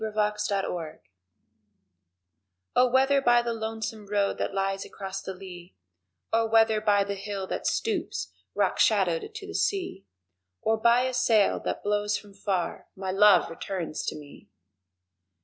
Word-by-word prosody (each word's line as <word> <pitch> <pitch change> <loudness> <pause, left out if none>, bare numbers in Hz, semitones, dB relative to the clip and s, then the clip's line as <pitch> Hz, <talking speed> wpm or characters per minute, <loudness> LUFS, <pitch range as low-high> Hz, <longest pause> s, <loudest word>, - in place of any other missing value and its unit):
The 220 - -1
Way 210 -2 0
to - - -3
Wait 165 -3 -6 1.8
O 250 0 +5
WHETHER 270 +2 +3
by 240 -2 +4
the 235 -1 -1
lonesome 220 -1 -5
road 200 -1 0
that - - -1
lies 195 0 -1
across 195 0 -6
the 190 - -6
lea 180 -2 -11 0.6
Or 225 0 +3
whether 225 -1 +4
by 205 -2 +3
the 200 0 -3
hill 200 0 -5
that - - -3
stoops, 450 -2 -2 0.2
rock - - +1
shadowed, 435 -3 +2
to 430 -3 -7
the 405 - -8
sea, 375 - -1 0.6
Or 220 0 +2
by 235 +2 +4
a 255 0 -1
sail 225 -4 +3
that - - -3
blows 205 0 0
from 205 -1 -14
far, 190 -4 -3
my 190 -1 -3
love 205 +1 +6
returns 170 -1 -4
to - - -2
me! 145 -2 -13
210 Hz, 155 wpm, -27 LUFS, 195-230 Hz, 1.8 s, love